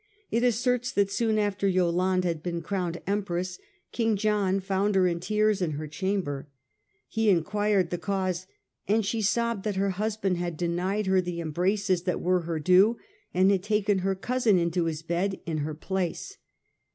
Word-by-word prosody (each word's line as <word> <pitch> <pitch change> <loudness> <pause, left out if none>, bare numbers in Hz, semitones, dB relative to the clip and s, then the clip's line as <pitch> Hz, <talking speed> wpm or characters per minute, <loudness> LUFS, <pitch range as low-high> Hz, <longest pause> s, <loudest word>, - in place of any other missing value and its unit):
It 230 - +2
asserts 245 0 +1
that 200 -1 +2
soon 220 +1 +1
after 205 -2 0
Yolande 185 0 +2
had 165 -3 -2
been 170 0 -3
crowned 175 -2 -2
Empress, 185 -3 -2 0.3
King 225 -2 +1
John 205 -2 +1
found 195 +1 0
her 190 -1 +4
in 170 -1 0
tears 215 +2 +1
in 165 -4 0
her 150 +2 -4
chamber. 160 -5 -2 0.6
He 225 -1 +1
enquired 200 +1 +2
the 175 - -2
cause, 185 -2 -2 0.4
and 215 +1 +2
she 225 +2 -1
sobbed 235 0 0
that 210 -2 -2
her 195 +1 +1
husband 200 -1 -1
had 175 -2 -3
denied 180 +5 -1
her 190 0 +3
the 175 -1 -4
embraces 180 +3 0
that 180 - 0
were 180 +1 +2
her 165 -1 -3
due 185 +9 +4 0.3
and 185 +2 +4
had 195 -2 +2
taken 205 -1 +1
her 190 +1 0
cousin 235 0 +2
into 170 0 +1
his 160 -1 -3
bed 180 +4 -1
in 160 -2 -2
her 150 +1 -3
place. 190 - -3
190 Hz, 175 wpm, -27 LUFS, 175-210 Hz, 0.6 s, her